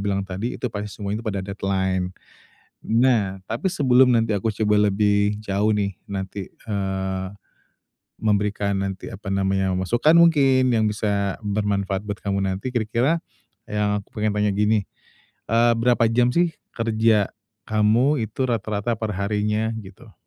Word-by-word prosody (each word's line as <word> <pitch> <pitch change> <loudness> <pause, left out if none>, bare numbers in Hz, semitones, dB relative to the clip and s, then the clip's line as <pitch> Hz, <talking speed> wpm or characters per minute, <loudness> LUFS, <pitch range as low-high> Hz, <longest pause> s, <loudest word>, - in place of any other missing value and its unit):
bilang 100 -1 0
tadi, 100 +5 -4
itu - - -12
pasti 105 0 -4
semuanya 105 +1 -4
pada 100 -4 -3
deadline. 95 -2 -1 0.7
Nah, 115 -5 +2
tapi 115 - -2
sebelum 130 -6 +4
nanti 115 -3 +2
aku 100 +2 -1
coba 105 -1 +2
lebih 105 +1 +2
jauh 105 0 -1
nih, 100 -2 0
nanti, 95 -1 -5
eee, 95 -2 -3 0.9
memberikan 105 -1 0
nanti, 95 -1 -4
apa 100 +1 -10
namanya, 95 -1 +1
masukkan 120 - +2
mungkin, 135 -6 +5
yang 110 -2 +2
bisa 100 -2 -1
bermanfaat 100 -1 -1
buat 105 0 -3
kamu 100 -1 0
nanti, 95 +6 -2
kira-kira 120 +7 +1 0.5
yang 105 -1 0
aku - - -25
pengen 105 0 0
tanya 105 0 +1
gini, 105 -1 +1 0.6
eee, 115 +1 +4
berapa 120 0 +3
jam 120 +1 +3
sih, 170 -2 +1 0.2
kerja 110 -2 +2 0.4
kamu 115 +5 +2
itu 130 +4 -2
rata-rata 110 -1 -1
per 110 -1 -2
harinya, 105 +2 0
gitu? 105 +2 -13
105 Hz, 140 wpm, -23 LUFS, 100-115 Hz, 0.9 s, mungkin